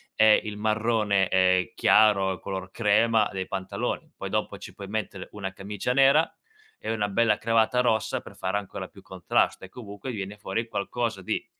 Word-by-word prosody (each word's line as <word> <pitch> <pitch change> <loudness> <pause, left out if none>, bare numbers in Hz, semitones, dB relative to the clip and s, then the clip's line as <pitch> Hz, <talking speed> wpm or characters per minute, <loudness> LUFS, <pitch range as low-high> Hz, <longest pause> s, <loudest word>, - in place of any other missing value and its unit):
e 110 0 +6
il 105 -1 -6
marrone, 105 -2 +1
ehm, 90 -1 +3
chiaro, 95 -3 +4
color 95 -1 -5
crema, 110 +1 +3
dei 95 -1 -4
pantaloni. 95 -1 -4
Poi - - -6
dopo - - -2
ci - - -10
puoi 100 - -9
mettere 105 -2 -4
una 95 -2 -6
camicia 105 +5 -3
nera 140 +4 +5 0.5
e - - -4
una 105 -2 0
bella 105 +1 +2
cravatta 115 +2 +2
rossa 110 -3 +1
per 100 - -13
fare 95 +1 -2
ancora 100 -2 -6
più - - -16
contrasto - - 0
e - - -14
comunque 105 +2 -8
viene 100 -2 -6
fuori 105 +2 -3
qualcosa 115 0 -3
di - - -3
105 Hz, 170 wpm, -26 LUFS, 95-115 Hz, 0.5 s, e